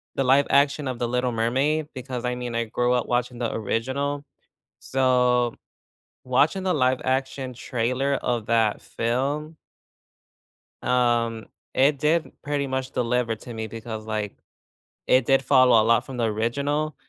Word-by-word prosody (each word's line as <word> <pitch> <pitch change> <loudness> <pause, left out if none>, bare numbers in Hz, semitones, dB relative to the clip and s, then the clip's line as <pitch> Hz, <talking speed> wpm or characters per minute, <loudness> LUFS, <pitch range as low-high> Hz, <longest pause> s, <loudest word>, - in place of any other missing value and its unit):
the 135 - +1
live 135 +2 +4
action 140 0 +3
of 130 -2 -3
The 120 - 0
Little 125 0 0
Mermaid, 135 +7 0
because 130 -2 -5
I 125 0 -1
mean, 125 -1 -5
I 115 - +1
grew 120 +2 0
up 125 - 0
watching 125 0 -1
the 120 - -2
original. 130 +6 -2 0.6
So, 125 -3 +2 0.7
watching 145 +9 +2
the 185 -1 +1
live-action 130 -1 0
trailer 125 +4 -1
of 120 -4 -1
that 115 -2 +1
film 140 +7 -2 1.3
um, 120 -2 +1 0.3
it 140 +1 +3
did 155 +2 +1
pretty 145 -1 -1
much 130 0 -3
deliver 120 -1 0
to 120 +2 -10
me 110 -1 -4
because, 110 0 -7
like, 105 -2 -3 0.7
it 130 -1 +4
did 135 +1 +4
follow 130 -4 +5
a - - +2
lot 115 +2 +3
from 135 -2 -8
the 120 - +1
original. 140 +8 -1
125 Hz, 150 wpm, -24 LUFS, 115-140 Hz, 1.3 s, follow